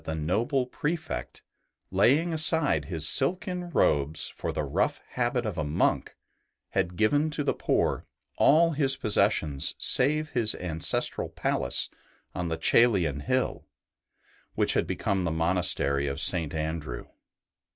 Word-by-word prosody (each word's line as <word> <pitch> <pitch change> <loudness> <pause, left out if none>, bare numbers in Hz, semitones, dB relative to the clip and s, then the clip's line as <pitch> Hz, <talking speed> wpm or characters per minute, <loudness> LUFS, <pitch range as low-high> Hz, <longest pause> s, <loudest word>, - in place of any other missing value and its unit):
BENEDICT 80 -1 -4
noble 120 - 0
Prefect, 155 +5 -4 0.5
laying 140 - +3
aside 155 - +2
his 80 -1 +1
silken 180 - +1
robes 75 - +1
for - - -5
the - - -3
rough - - -1
habit 120 -1 -1
of 100 -6 -3
a - - 0
monk, 75 +1 0 0.5
had 90 - -1
given 145 - +2
to 150 -1 -3
the 140 - +1
poor - - -1 0.3
all 165 +3 +4
his 140 -3 +1
possessions 80 - +1
save 155 +4 +2
his 115 -6 0
ancestral 80 -3 -2
palace - - 0 0.5
on 90 -1 -3
the 80 -1 -2
Coelian 90 - +3
hill, 130 - -2 0.9
which - - +2
had - - 0
become 95 -2 -1
the 85 - -1
monastery 80 -4 0
of 70 0 -3
St. 80 -4 +1
Andrew. 80 -5 -4
100 Hz, 130 wpm, -27 LUFS, -, 0.9 s, all